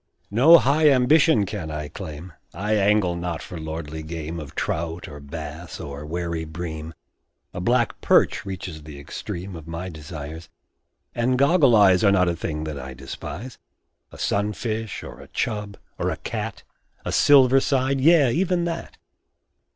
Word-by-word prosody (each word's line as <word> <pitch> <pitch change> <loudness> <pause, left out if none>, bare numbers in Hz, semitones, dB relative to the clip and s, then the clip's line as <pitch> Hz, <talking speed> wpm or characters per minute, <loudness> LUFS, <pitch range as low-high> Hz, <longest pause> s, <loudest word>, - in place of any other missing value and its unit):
No 140 +11 +8
high 150 +1 +4
ambition 135 -2 +4
can 90 -4 -5
I 75 -1 -4
claim 80 +3 -8 0.2
I 105 +2 -1
angle 100 -3 +3
not 85 -2 -4
for 90 - -8
lordly 80 0 -5
game 80 +1 -5
Of 75 -2 -9
trout, 85 +1 -3
or 70 - -9
bass, 75 +3 -8
or 70 +1 -7
wary 85 0 -3
bream 80 -1 -6 0.6
A 90 - -5
black 120 +4 +1
perch - - +3
reaches 95 -4 -6
the 75 -1 -10
extreme 90 +6 -6
Of 80 -1 -10
my 85 +3 -5
desires; 80 0 -8 0.6
and 125 +2 +1
"goggle 140 -2 +5
eyes" 95 -3 +5
Are 100 - +6
not 90 -2 +3
a 85 - -1
thing 75 -1 -4
that 75 -2 -5
I 65 0 -8
despise; 85 - -8 0.5
A - - -12
sunfish, 110 +1 -2
or - - -10
a - - -12
"chub," 105 -1 -3 0.2
or - - 0
a - - -3
"cat" 110 -1 -5 0.4
A - - -2
"silver 135 -2 +6
side" 135 0 +1
yea, 150 -4 +5
even 180 +1 +1
that! 170 -1 -4
90 Hz, 160 wpm, -24 LUFS, 80-120 Hz, 0.6 s, No